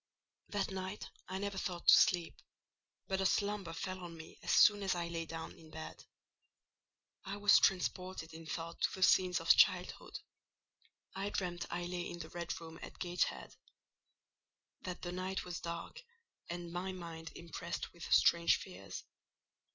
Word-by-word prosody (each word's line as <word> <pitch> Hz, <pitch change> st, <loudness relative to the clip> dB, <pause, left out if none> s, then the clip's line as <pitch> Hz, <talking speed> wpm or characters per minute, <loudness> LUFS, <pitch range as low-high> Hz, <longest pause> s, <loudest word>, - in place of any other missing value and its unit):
That 200 Hz, -1 st, -1 dB
night 190 Hz, +1 st, -5 dB, 0.2 s
I 185 Hz, -, -3 dB
never 200 Hz, 0 st, -2 dB
thought 175 Hz, -2 st, -4 dB
to -, -, +11 dB
sleep; 175 Hz, -2 st, +4 dB, 0.7 s
but 190 Hz, 0 st, 0 dB
a -, -, +1 dB
slumber 200 Hz, -3 st, 0 dB
fell 185 Hz, +3 st, -4 dB
on 170 Hz, -2 st, -8 dB
me 160 Hz, -, -11 dB
as -, -, -7 dB
soon 205 Hz, -1 st, +7 dB
as 190 Hz, -2 st, +1 dB
I 170 Hz, -1 st, -2 dB
lay 165 Hz, -1 st, -3 dB
down 165 Hz, 0 st, -5 dB
in 160 Hz, -, -15 dB
bed. 160 Hz, 0 st, -8 dB, 1.2 s
I 195 Hz, +1 st, -5 dB
was 205 Hz, 0 st, +7 dB
transported 185 Hz, -3 st, 0 dB
in 160 Hz, 0 st, -9 dB
thought 165 Hz, +1 st, -5 dB
to -, -, +2 dB
the 190 Hz, -, 0 dB
scenes 185 Hz, -1 st, +5 dB
of -, -, +6 dB
childhood: -, -, +3 dB, 1.0 s
I 195 Hz, +1 st, -2 dB
dreamt 175 Hz, -3 st, -2 dB
I 175 Hz, 0 st, -2 dB
lay 175 Hz, 0 st, -3 dB
in 175 Hz, -, -6 dB
the 160 Hz, -2 st, -7 dB
red 170 Hz, -1 st, -4 dB
room 165 Hz, 0 st, -10 dB
at -, -, -9 dB
Gateshead; 175 Hz, 0 st, -1 dB, 1.3 s
that 180 Hz, -1 st, -6 dB
the 175 Hz, -, -3 dB
night 185 Hz, +1 st, -3 dB
was 180 Hz, -1 st, -4 dB
dark, 170 Hz, -, -5 dB, 0.5 s
and 175 Hz, 0 st, -5 dB
my 185 Hz, +2 st, -2 dB
mind 165 Hz, -3 st, -7 dB
impressed 170 Hz, -2 st, -5 dB
with -, -, -8 dB
strange 170 Hz, 0 st, +6 dB
fears. 95 Hz, +1 st, -8 dB
175 Hz, 160 wpm, -35 LUFS, 170-190 Hz, 1.3 s, to